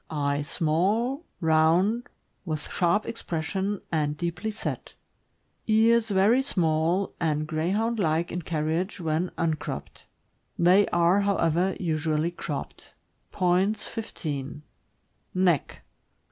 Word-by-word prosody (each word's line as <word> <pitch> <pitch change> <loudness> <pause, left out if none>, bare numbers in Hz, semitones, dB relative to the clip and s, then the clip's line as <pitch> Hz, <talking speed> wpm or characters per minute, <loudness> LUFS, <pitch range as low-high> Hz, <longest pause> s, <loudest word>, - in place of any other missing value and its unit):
Eyes 145 -1 -1
small, 210 - 0 0.2
round, 165 +8 +3 0.3
with 155 -5 -4
sharp 175 +4 +2
expression 190 0 -3
and 150 -2 0
deeply 170 +6 -3
set. 215 0 -5 0.7
Ears 225 +1 +4
very 205 +6 +4
small, 170 - +1
and 155 -2 0
Greyhound 195 +9 -1
like 165 -1 +1
in 175 - -3
carriage 165 +5 -2
when 165 +1 -1
un 165 -1 +1
cropped; 155 - -7 0.5
they 185 +4 +5
are, 175 +3 +3
however, 185 -2 +1
usually 160 -1 0
cropped. 155 -4 -7 0.4
Points, 190 +4 +1
15. 150 -9 -5 0.7
Neck. 180 -6 +1
175 Hz, 105 wpm, -26 LUFS, 155-200 Hz, 0.7 s, they